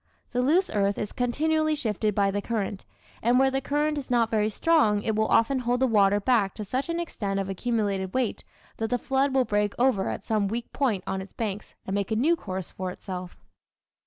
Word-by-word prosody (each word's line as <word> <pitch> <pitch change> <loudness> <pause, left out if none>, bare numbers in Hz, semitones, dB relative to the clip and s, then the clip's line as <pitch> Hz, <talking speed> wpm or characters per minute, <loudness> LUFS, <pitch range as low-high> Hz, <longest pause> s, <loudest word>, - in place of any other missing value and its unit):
The 250 - +1
loose 330 +9 +2
earth 200 -1 +1
is 210 - -3
continually 310 +5 +1
shifted 215 -6 -1
by 200 -1 +2
the 205 +1 -1
current, 205 -2 -3 0.4
and 240 +2 +3
where 265 +1 +4
the 270 0 0
current 295 +2 0
is 275 - -9
not 235 -2 +2
very 215 -1 +2
strong 220 -5 +2
it 220 - 0
will 220 0 +2
often 260 +4 +3
hold 245 0 0
the 265 - +4
water 205 -4 +4
back 205 -3 +2
to 210 - -5
such 260 - -2
an 335 0 -1
extent 200 -12 -3
of 195 0 -3
accumulated 200 -2 -1
weight 255 -4 -1 0.3
that 225 0 -2
the 245 - +1
flood 270 +2 +1
will 260 -1 +2
break 205 -1 0
over 240 -6 +2
at - - -5
some 215 -2 +1
weak 230 +3 -4
point 225 -10 0
on 190 - -2
its 190 - -11
banks 210 -2 -4
and 190 - -4
make 200 -1 -1
a 220 - 0
new 300 +10 +3
course 190 - -6
for 185 0 -4
itself. 180 -1 -7
225 Hz, 220 wpm, -26 LUFS, 200-265 Hz, 0.4 s, where